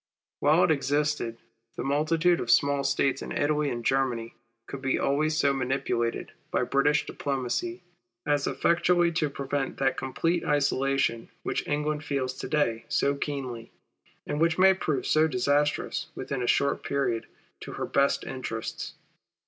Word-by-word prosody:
While -, -, +4 dB
it -, -, +4 dB
existed 145 Hz, -4 st, 0 dB, 0.4 s
the -, -, -4 dB
multitude 160 Hz, +5 st, +2 dB
of 120 Hz, -, -4 dB
small 140 Hz, +3 st, +3 dB
States 140 Hz, -1 st, +1 dB
in -, -, -6 dB
Italy 150 Hz, 0 st, +1 dB
and 120 Hz, -2 st, -4 dB
Germany 125 Hz, -4 st, 0 dB, 0.3 s
could 140 Hz, -, -7 dB
be 135 Hz, -1 st, +1 dB
always 155 Hz, +3 st, +1 dB
so 140 Hz, -2 st, +3 dB
manipulated 125 Hz, -3 st, -1 dB, 0.2 s
by -, -, +1 dB
British 145 Hz, +1 st, +2 dB
diplomacy, 145 Hz, +7 st, -3 dB, 0.4 s
as 145 Hz, -1 st, +1 dB
eifectually 175 Hz, 0 st, +2 dB
to 155 Hz, -4 st, +1 dB
prevent 140 Hz, 0 st, -3 dB
that 135 Hz, -1 st, +1 dB
complete 165 Hz, +6 st, -1 dB
isolation 135 Hz, -4 st, +1 dB
which -, -, -2 dB
England 150 Hz, +1 st, -1 dB
feels 135 Hz, -3 st, -2 dB
to -, -, -4 dB
day 120 Hz, -7 st, 0 dB
so 140 Hz, -, +1 dB
keenly, 135 Hz, -5 st, -5 dB, 0.5 s
and 145 Hz, -, -2 dB
which 165 Hz, 0 st, +3 dB
may 190 Hz, +1 st, +7 dB
prove 155 Hz, -7 st, -2 dB
so 155 Hz, +1 st, +4 dB
disastrous 145 Hz, +2 st, 0 dB
within 135 Hz, -3 st, -4 dB
a 120 Hz, -, -1 dB
short 140 Hz, +3 st, +2 dB
period 135 Hz, -5 st, -1 dB, 0.3 s
to -, -, -8 dB
her -, -, -3 dB
best 140 Hz, 0 st, +2 dB
interests. 120 Hz, -4 st, -5 dB
140 Hz, 150 wpm, -27 LUFS, 135-150 Hz, 0.5 s, may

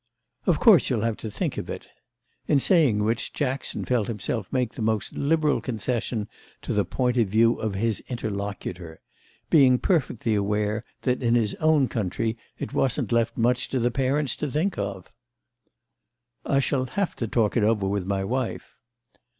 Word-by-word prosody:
"Of -, -, +3 dB
course 215 Hz, -8 st, +6 dB
you'll 115 Hz, -5 st, 0 dB
have 115 Hz, -2 st, 0 dB
to 110 Hz, -, -6 dB
think -, -, -2 dB
of -, -, -7 dB
it." -, -, -6 dB, 0.6 s
In 145 Hz, -, +4 dB
saying 135 Hz, -, +3 dB
which 115 Hz, +2 st, -1 dB
Jackson 135 Hz, -2 st, -2 dB
felt 120 Hz, -5 st, +1 dB
himself 110 Hz, -1 st, -3 dB
make 125 Hz, -3 st, 0 dB
the -, -, -7 dB
most 110 Hz, -1 st, 0 dB
liberal 155 Hz, 0 st, +1 dB
concession 115 Hz, -2 st, -2 dB, 0.4 s
to -, -, -2 dB
the 105 Hz, -1 st, +2 dB
point 125 Hz, +5 st, 0 dB
of 115 Hz, -3 st, +3 dB
view 115 Hz, +4 st, +3 dB
of 110 Hz, -3 st, -3 dB
his 110 Hz, +2 st, 0 dB
interlocutor; 100 Hz, -7 st, -5 dB, 0.5 s
being 135 Hz, -5 st, +6 dB
perfectly 125 Hz, -, 0 dB
aware 105 Hz, +2 st, 0 dB, 0.2 s
that 125 Hz, -1 st, 0 dB
in 120 Hz, -1 st, +2 dB
his 110 Hz, -3 st, +1 dB
own 155 Hz, -4 st, +3 dB
country 110 Hz, +1 st, -2 dB, 0.2 s
it -, -, -6 dB
wasn't 130 Hz, -2 st, 0 dB
left 115 Hz, -1 st, +1 dB
much 120 Hz, +2 st, +1 dB
to 135 Hz, -, -1 dB
the 120 Hz, +1 st, +1 dB
parents 135 Hz, +3 st, +1 dB
to 150 Hz, -, -2 dB
think 170 Hz, +7 st, 0 dB
of. 100 Hz, -, -4 dB, 1.4 s
"I 135 Hz, -, +3 dB
shall 130 Hz, -1 st, 0 dB
have 200 Hz, +7 st, -2 dB
to 115 Hz, -, -2 dB
talk 110 Hz, -1 st, +1 dB
it 120 Hz, -, +3 dB
over 105 Hz, -2 st, +2 dB
with 100 Hz, -1 st, -2 dB
my 95 Hz, -1 st, 0 dB
wife." 125 Hz, +4 st, -3 dB
115 Hz, 170 wpm, -25 LUFS, 105-130 Hz, 1.4 s, course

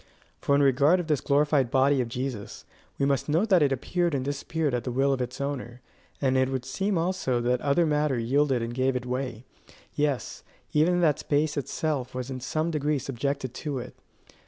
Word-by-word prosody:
For 140 Hz, -, +2 dB
in 145 Hz, -, +4 dB
regard 140 Hz, +6 st, +4 dB
of 175 Hz, -, -3 dB
this 150 Hz, -4 st, 0 dB
glorified 145 Hz, -2 st, +2 dB
body 135 Hz, +1 st, +3 dB
of 120 Hz, -, -2 dB
Jesus, 125 Hz, -3 st, -5 dB, 0.3 s
we 140 Hz, -, +1 dB
must 140 Hz, 0 st, 0 dB
note 170 Hz, +9 st, +2 dB
that 185 Hz, -4 st, +5 dB
it 145 Hz, -2 st, +3 dB
appeared 170 Hz, +5 st, 0 dB
and 130 Hz, -1 st, -2 dB
disappeared 145 Hz, +1 st, -2 dB
at 125 Hz, -, -1 dB
the 125 Hz, -, -3 dB
will 135 Hz, +3 st, +2 dB
of 130 Hz, -, -2 dB
its 125 Hz, +2 st, -4 dB
owner; 135 Hz, -4 st, -4 dB, 0.4 s
and 130 Hz, -2 st, +1 dB
it 130 Hz, 0 st, +2 dB
would 130 Hz, -2 st, -3 dB
seem 195 Hz, +8 st, -1 dB
also 165 Hz, -7 st, 0 dB
that 125 Hz, +1 st, +1 dB
other 145 Hz, +4 st, +2 dB
matter 150 Hz, -3 st, +1 dB
yielded 130 Hz, +1 st, +1 dB
and 115 Hz, +1 st, -4 dB
gave 130 Hz, +1 st, +1 dB
it 125 Hz, 0 st, -3 dB
way; 125 Hz, -2 st, -4 dB, 0.5 s
yes, 145 Hz, -3 st, -2 dB, 0.3 s
even 175 Hz, +4 st, +3 dB
that 150 Hz, -5 st, +3 dB
space 150 Hz, +1 st, 0 dB
itself 140 Hz, -2 st, -2 dB
was 130 Hz, +1 st, -4 dB
in 130 Hz, -, -4 dB
some 155 Hz, +6 st, -1 dB
degree 150 Hz, -1 st, 0 dB
subjected 135 Hz, 0 st, -3 dB
to 145 Hz, 0 st, -4 dB
it. 125 Hz, 0 st, -7 dB
140 Hz, 200 wpm, -27 LUFS, 130-150 Hz, 0.5 s, that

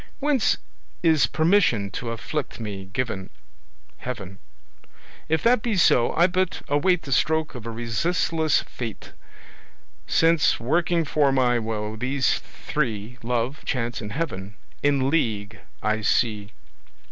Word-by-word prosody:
Whence 285 Hz, -5 st, +2 dB, 0.5 s
is 160 Hz, -3 st, +4 dB
permission 160 Hz, -, +2 dB
to 120 Hz, -, -4 dB
afflict 125 Hz, +5 st, -4 dB
me 100 Hz, -4 st, -5 dB
given? 100 Hz, -2 st, -3 dB, 0.7 s
Heaven. 95 Hz, -7 st, -6 dB, 0.9 s
If 160 Hz, 0 st, +1 dB
that 235 Hz, -1 st, +4 dB
be 225 Hz, -4 st, -1 dB
so, 125 Hz, -8 st, +4 dB
I 170 Hz, -, +5 dB
but 185 Hz, 0 st, 0 dB
await 160 Hz, +4 st, +2 dB
The 140 Hz, -, -7 dB
stroke 160 Hz, +3 st, +2 dB
of 120 Hz, -3 st, -8 dB
a -, -, -2 dB
resistless 155 Hz, +7 st, 0 dB
fate, 115 Hz, -4 st, -7 dB, 1.0 s
Since, 165 Hz, -1 st, +3 dB
working 165 Hz, +6 st, +1 dB
for 145 Hz, -1 st, +2 dB
my 125 Hz, -2 st, +3 dB
woe, 110 Hz, -1 st, -3 dB
these 130 Hz, +3 st, +1 dB, 0.3 s
three, 120 Hz, -4 st, -2 dB
Love, 120 Hz, +4 st, -2 dB
Chance 120 Hz, -3 st, -2 dB
and 105 Hz, -1 st, -6 dB
Heaven, 105 Hz, -, -4 dB, 0.3 s
in 140 Hz, -2 st, +2 dB
league 110 Hz, -9 st, -1 dB, 0.2 s
I 110 Hz, +1 st, +1 dB
see. 105 Hz, -1 st, +1 dB
125 Hz, 125 wpm, -24 LUFS, 110-160 Hz, 1.0 s, I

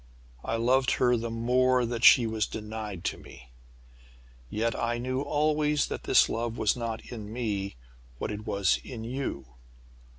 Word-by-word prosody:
I 115 Hz, -, -2 dB
loved 130 Hz, +3 st, +2 dB
her 125 Hz, -1 st, +3 dB
the 115 Hz, 0 st, -3 dB
more 125 Hz, +2 st, +2 dB
that 120 Hz, 0 st, -4 dB
she 120 Hz, -, +8 dB
was 110 Hz, -1 st, -1 dB
denied 105 Hz, -4 st, -6 dB
to -, -, -2 dB
me! 65 Hz, 0 st, -14 dB, 1.0 s
Yet 115 Hz, -, -1 dB
I 120 Hz, 0 st, -1 dB
knew 130 Hz, +2 st, -2 dB
always 150 Hz, 0 st, +1 dB
that -, -, -5 dB
this -, -, +5 dB
love 115 Hz, 0 st, -3 dB
was 110 Hz, -2 st, +2 dB
not 115 Hz, -2 st, -5 dB
in 110 Hz, -3 st, -7 dB
me 105 Hz, -, -3 dB, 0.4 s
what -, -, -3 dB
it 105 Hz, +1 st, -7 dB
was 100 Hz, -3 st, +2 dB
in 115 Hz, -3 st, -7 dB
you. 120 Hz, -, -4 dB
115 Hz, 160 wpm, -28 LUFS, 110-125 Hz, 1.0 s, she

